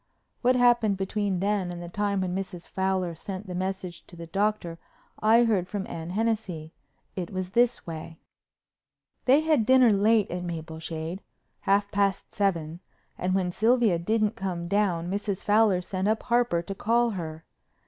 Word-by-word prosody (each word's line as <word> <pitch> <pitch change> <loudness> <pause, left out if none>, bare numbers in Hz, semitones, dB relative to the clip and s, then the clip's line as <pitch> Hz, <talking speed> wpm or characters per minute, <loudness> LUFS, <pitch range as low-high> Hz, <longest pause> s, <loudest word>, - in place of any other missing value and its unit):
What 255 +1 +4
happened 240 -5 +4
between 195 -1 -1
then 200 -3 0
and 175 - -6
the 175 - -7
time 200 +2 -1
when 180 -1 -2
Mrs. 185 -2 -5
Fowler 190 -2 -1
sent 190 +4 -7
the 185 - -6
message 185 -1 -4
to - - -13
the 170 0 -8
Doctor 195 -2 -1 0.4
I 225 +2 +5
heard 205 -6 +1
from 200 -1 -4
Anne 165 0 -6
Hennessey. 195 -6 -2 0.4
It 180 -3 -4
was 185 -1 -4
this 240 +3 +2
way: 165 0 -7 1.1
They 270 +4 +5
had 315 -7 +3
dinner 255 -1 +6
late 210 +1 +3
at 180 0 -3
Mapleshade—half 165 +4 -3
past 200 -1 0
seven—and 180 0 -3
when 185 -2 0
Sylvia 225 -3 +3
didn't 215 +4 +1
come 180 -3 -3
down 180 -3 +1
Mrs. 200 +1 -3
Fowler 210 -3 +4
sent 190 +2 -2
up 220 +1 +1
Harper 235 -8 +1
to 195 - -5
call 235 +4 +2
her. 160 -4 -6
195 Hz, 155 wpm, -27 LUFS, 175-215 Hz, 1.1 s, dinner